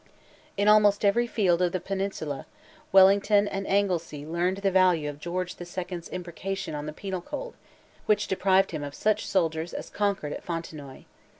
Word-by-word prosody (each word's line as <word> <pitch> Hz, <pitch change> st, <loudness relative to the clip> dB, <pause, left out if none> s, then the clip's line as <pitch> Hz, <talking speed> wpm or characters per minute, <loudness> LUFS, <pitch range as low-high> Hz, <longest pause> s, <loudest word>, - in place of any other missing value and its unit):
In 200 Hz, +1 st, +1 dB
almost 210 Hz, -1 st, +5 dB
every 235 Hz, +4 st, +3 dB
field 185 Hz, -7 st, +2 dB
of 180 Hz, -1 st, +1 dB
the 185 Hz, -, 0 dB
Peninsula, 190 Hz, -7 st, -4 dB, 0.4 s
Wellington 200 Hz, +2 st, +5 dB
and 195 Hz, -1 st, -4 dB
Anglesea 175 Hz, -7 st, 0 dB
learned 175 Hz, +4 st, -1 dB
the 195 Hz, -, +3 dB
value 180 Hz, -5 st, +3 dB
of 145 Hz, 0 st, -6 dB
George 175 Hz, +3 st, -4 dB
the -, -, -7 dB
Second's 175 Hz, -1 st, -6 dB
imprecation 185 Hz, 0 st, -5 dB
on 150 Hz, 0 st, -5 dB
the -, -, -3 dB
Penal 190 Hz, +3 st, -5 dB
Code, -, -, -6 dB, 0.5 s
which 210 Hz, 0 st, +2 dB
deprived 190 Hz, 0 st, +2 dB
him 155 Hz, -3 st, -4 dB
of 145 Hz, 0 st, -6 dB
such 215 Hz, 0 st, 0 dB
soldiers 165 Hz, -3 st, 0 dB
as -, -, -6 dB
conquered 200 Hz, -8 st, -1 dB
at -, -, -7 dB
Fontenoy. 155 Hz, -5 st, -6 dB
185 Hz, 170 wpm, -27 LUFS, 165-200 Hz, 0.5 s, almost